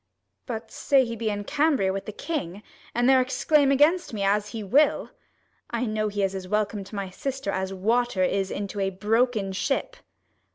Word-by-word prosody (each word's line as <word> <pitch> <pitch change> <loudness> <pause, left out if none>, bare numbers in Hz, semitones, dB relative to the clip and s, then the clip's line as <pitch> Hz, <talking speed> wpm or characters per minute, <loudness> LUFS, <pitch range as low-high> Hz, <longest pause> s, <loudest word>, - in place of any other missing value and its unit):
But 225 -2 -5
say 270 -2 +3
he 230 -1 -4
be 225 -1 -2
in 205 -1 -3
Cambria 280 -7 +1
with 195 - -5
the - - -3
king, 245 - -4
35 205 +3 -12 0.3
And 240 +1 +2
there 260 -1 +6
exclaim 280 +2 +2
against 295 0 +3
me, 200 - -2
as 205 +1 +2
he 225 -1 -5
will: 280 +10 +2 0.6
I 235 +1 -1
know 215 -1 -1
he 205 -1 -2
is 195 0 0
as 190 -1 -6
welcome 210 0 -1
to 210 - -10
my 195 -2 -4
sister, 270 +1 -3
As 190 0 -2
water 220 +1 +1
is 195 +1 0
into 205 0 -4
a 195 0 +1
broken 215 +1 +1
ship. 285 - -1
215 Hz, 195 wpm, -26 LUFS, 195-260 Hz, 0.6 s, there